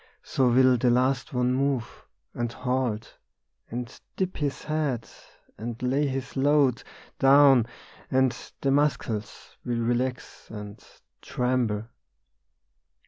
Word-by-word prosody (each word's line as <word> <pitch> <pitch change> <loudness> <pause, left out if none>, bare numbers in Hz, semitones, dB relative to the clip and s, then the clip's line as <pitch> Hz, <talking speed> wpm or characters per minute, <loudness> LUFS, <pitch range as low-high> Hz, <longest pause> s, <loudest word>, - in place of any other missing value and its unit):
So 130 -2 +1
will 130 +1 +5
the 125 - +3
last 130 +3 +1
one 125 -1 +1
move, 135 -3 -2 0.3
And 120 -1 -2
halt, 125 -4 -2 0.5
and 120 0 -6
dip 185 -1 -2
his 145 -3 -2
head, 150 -6 -1 0.5
and 115 +1 -5
lay 135 +4 +1
his 130 -1 -4
load 140 -2 +3 0.4
Down, 135 -3 +6 0.4
and 130 -1 +2 0.3
the 135 - +1
muscles 135 -7 -1
will 120 -1 -2
relax 120 +2 -2
and 105 -1 -9 0.4
tremble. 125 -4 -1
125 Hz, 110 wpm, -26 LUFS, 120-135 Hz, 0.5 s, Down